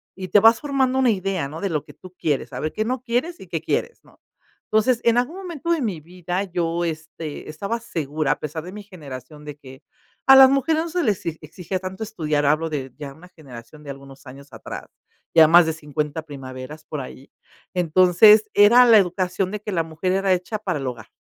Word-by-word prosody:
y 185 0 -6
te 205 - +6
vas 225 +2 +5
formando 265 -3 0
una 260 -2 +3
idea, 190 -6 -2
¿no?, 155 +3 -8
de 200 - -1
lo 150 -4 -2
que - - -15
tú 185 -1 -15
quieres, 145 -3 -2
a 125 - -5
ver 155 - -2
qué 215 - -2
no 255 +1 -2
quieres 255 +9 -2
y - - -12
qué - - -3
quieres, 475 - -3
¿no? - - -24 0.5
Entonces, 225 +3 +2
en 235 0 +3
algún 250 +8 -2
momento 340 -4 -5
de 330 -4 +1
mi 200 -9 -2
vida 180 +3 -4
yo, 175 -2 -2
este, 160 -2 -6
estaba 200 +9 -4
segura, 155 -9 -2
a - - -13
pesar 155 +1 -5
de 180 - -9
mi 210 - -8
generación 150 - -11
de 150 -1 -8
que 135 -1 -14 0.4
a 270 - +9
las 265 0 +9
mujeres 310 +4 +1
no - - -6
se 350 +1 -1
les 205 -5 0
e 160 -1 -3
exigía 180 +4 -5
tanto 190 +3 -6
estudiar, 155 -9 -2
hablo 155 +3 +1
de 135 -4 -5
ya 145 -2 -8
una 165 +5 -16
generación 145 -3 -13
de 140 - -7
algunos 135 0 -13
años 140 +2 -13
atrás, - - -8 0.5
ya 160 -1 +8
más 170 +2 +7
de 160 - 0
50 150 0 -4
primaveras 135 +1 -9
por 150 -2 -5
ahí. 130 +1 -11 0.5
Entonces, 185 +5 +5
era 230 +5 +7
la 230 -2 +7
educación 185 0 0
de 210 -1 -5
que 210 - -5
la 170 -3 0
mujer 160 +3 -3
era 195 0 +2
hecha 180 +4 -3
para 185 -7 -3
el 135 - -4
hogar, 115 -3 -7
175 Hz, 220 wpm, -22 LUFS, 150-215 Hz, 0.5 s, a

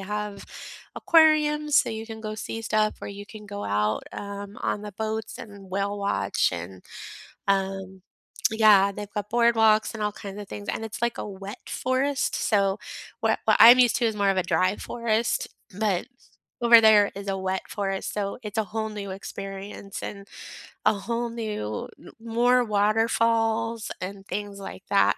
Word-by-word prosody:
have 210 0 -5 0.5
aquariums, 300 -2 +4
so - - +2
you 220 0 -5
can 220 -1 -8
go 215 -1 -5
see 225 +1 -5
stuff 215 -1 +1
or - - -4
you 200 0 -8
can 215 -1 -11
go 205 0 -6
out, 105 +1 0
um, 200 0 -7
on 210 - -1
the 210 -1 -7
boats 220 +1 -3
and 200 -6 -11
whale 200 +1 -1
watch 200 0 +1
and, 90 +2 -7 0.6
um 190 -1 -1 0.5
yeah, 210 -3 +6
they've 205 +1 -8
got 210 -1 -4
boardwalks 225 -2 +3
and 220 - -4
all 210 - +1
kinds 200 0 -8
of 205 - -9
things, 100 -1 -8
and 225 - -2
it's, 220 -1 -7
like, 235 0 0
a - - -4
wet 195 +4 -8
forest, 260 +2 0
so, 200 -2 +1 0.4
what - - +2
what - - +5
I'm 240 +3 +10
used 245 -2 +4
to 235 0 +1
is 220 - -1
more 200 -1 +2
of 195 - 0
a 185 - +3
dry 185 +2 +2
forest, 230 -1 -1 0.3
but 205 -5 0 0.6
over 235 -1 +8
there 215 -2 +6
is 200 0 -7
a 195 - 0
wet 190 0 -2
forest, 195 -2 -3
so 200 -1 -3
it's 210 0 -6
a - - +3
whole 220 +1 -3
new 205 -2 -6
experience 195 +1 -7
and 200 -1 -7 0.6
a - - +5
whole 235 +4 -3
new 210 - -4
n - - -13
more 240 +2 +3
waterfalls 225 +1 +1
and 195 +1 -6
things, 205 -1 -5
like 190 -1 -8
that, 200 - +4
210 Hz, 175 wpm, -25 LUFS, 195-225 Hz, 0.6 s, I'm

